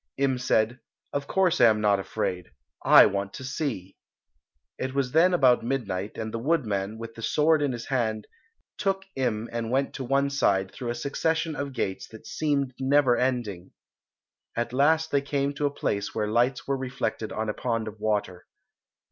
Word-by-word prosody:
Im 135 -2 +1
said, 120 0 +1 0.3
"Of 140 0 -2
course 190 -3 +2
I - - +9
am 110 -2 +4
not 105 -2 +3
afraid; 90 -2 -3 0.3
I - - +9
want 100 -1 -2
to - - -8
see." 130 - -4 0.8
It 130 +1 -3
was 135 -3 0
then 165 +5 +5
about 130 -10 +4
midnight, 110 -6 -3
and 110 -1 -4
the 115 - -2
woodman, 110 -8 -1
with 115 0 -8
the 115 - -10
sword 155 +5 +3
in 145 -2 +1
his 120 -1 -5
hand, 110 -5 -1 0.5
took 195 -1 0
Im 115 -4 -1
and 115 -1 -3
went 135 +3 0
to 135 - -5
one 140 +2 +1
side 95 -8 +1
through 125 -3 -6
a 120 - -2
succession 160 +5 -1
of 140 -1 -4
gates 95 -6 -3
that 110 - -13
seemed 140 -4 -1
never 135 -2 +4
ending. 120 -9 -2 0.8
At 120 +1 -2
last 160 +4 +3
they 140 - +2
came 140 0 -1
to 145 0 0
a - - -3
place 100 -7 -2
where 105 - 0
lights 120 +4 +1
were 135 0 0
reflected 130 -4 -3
on 110 0 -3
a 105 - -1
pond 115 -2 -2
of 110 0 -8
water. 105 -4 -2
125 Hz, 180 wpm, -26 LUFS, 110-140 Hz, 0.8 s, I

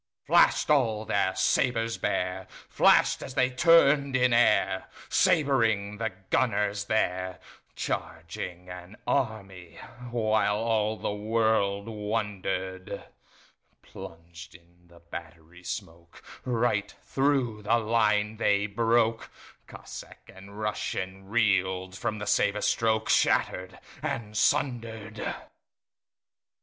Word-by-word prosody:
Flash'd - - +4
all 115 -7 +2
their 95 -2 0
sabres 115 -1 +1
bare, 90 +1 -2 0.2
Flash'd - - +4
as 130 - -8
they 125 0 +2
turn'd 140 -1 +4
in 125 -1 +3
airSabring 110 +1 +2
the 110 -1 -1 0.2
gunners 105 -4 +1
there, 95 -4 -1 0.4
Charging 85 +2 -5
an 90 +2 -10
army, 100 -9 -3 0.3
whileAll 110 -1 +1
the - - -2
world 105 -2 0
wonder'd:Plunged 95 -5 -7
in 85 0 -21
the 85 0 -19
battery 85 0 -10
smokeRight 100 +6 -4
thro' 135 -6 0
the 110 +3 +2
line 110 -1 +1
they 100 -2 +2
broke; 115 +2 +1 0.4
Cossack - - -11
and 95 +1 -12
RussianReel'd 95 -2 -1
from 105 +2 -3
the 105 - -5
sabre 105 0 +1
strokeShatter'd 110 -5 +1 0.2
and 105 -2 -4
sunder'd. 115 -4 -1
105 Hz, 90 wpm, -27 LUFS, 95-115 Hz, 0.4 s, Flash'd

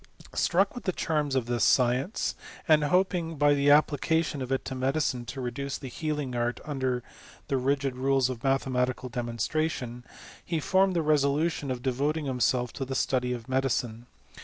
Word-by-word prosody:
Struck 195 +3 +2
with 245 - -8
the 185 - +2
charms 150 -5 -1
of 130 -3 +1
this 120 0 0
science, 130 - +2 0.3
and 155 -2 +5
oping 180 -1 +1
by 145 0 +4
the 140 0 +2
application 150 +1 +3
of 130 0 -4
it 135 - 0
to - - -4
medicine 130 -1 -1
to 120 +4 -7
reduce 130 +2 -3
the 135 - -8
healing 150 -1 -3
art 120 0 -1
under 130 -4 -1 0.5
the 135 - +1
rigid 135 0 0
rules 135 0 +2
of 125 -3 -6
mathematical 130 -1 0
demonstration, 120 +2 -2 0.4
he 165 -2 -2
formed 190 +4 +2
the 165 - +1
resolution 150 0 +1
of 125 -1 -3
devoting 145 +4 0
himself 125 -2 0
to 140 - -4
the 135 0 -4
study 125 -1 0
of 120 -2 -5
medicine. 125 -3 -1
135 Hz, 165 wpm, -28 LUFS, 125-150 Hz, 0.5 s, and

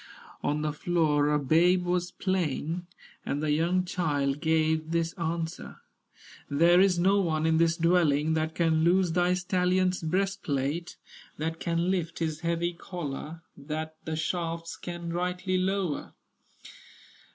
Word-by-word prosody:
On 150 +1 -1
the 150 -1 -1
floor 150 -3 +1
a 150 - +3
babe 175 +6 +3
was 175 0 0
playing, 175 -2 -2 0.4
And 140 - -2
the 150 0 0
young 175 +4 +1
child 145 -6 -1
gave 160 -1 +1
this 165 0 0
answer: 165 -1 -4 0.7
"There 170 +5 +5
is 190 -2 +4
no 195 +3 +3
one 160 -3 0
in 160 0 +3
this 165 0 +3
dwelling 160 -3 +3
That 160 0 -1
can 160 -2 +2
loose 180 +1 +3
thy 180 +1 +2
stallion's 180 0 +1
breastplate, 170 -3 -1 0.4
That 160 +2 -3
can 170 +2 0
lift 170 -3 -2
his 160 -2 -2
heavy 170 +1 -1
collar, 165 -2 -6
That 155 +2 -5
the 160 - -2
shafts 165 +1 -3
can 175 -1 -6
rightly 180 +1 -1
lower." 185 -4 -2
165 Hz, 135 wpm, -28 LUFS, 155-180 Hz, 0.7 s, There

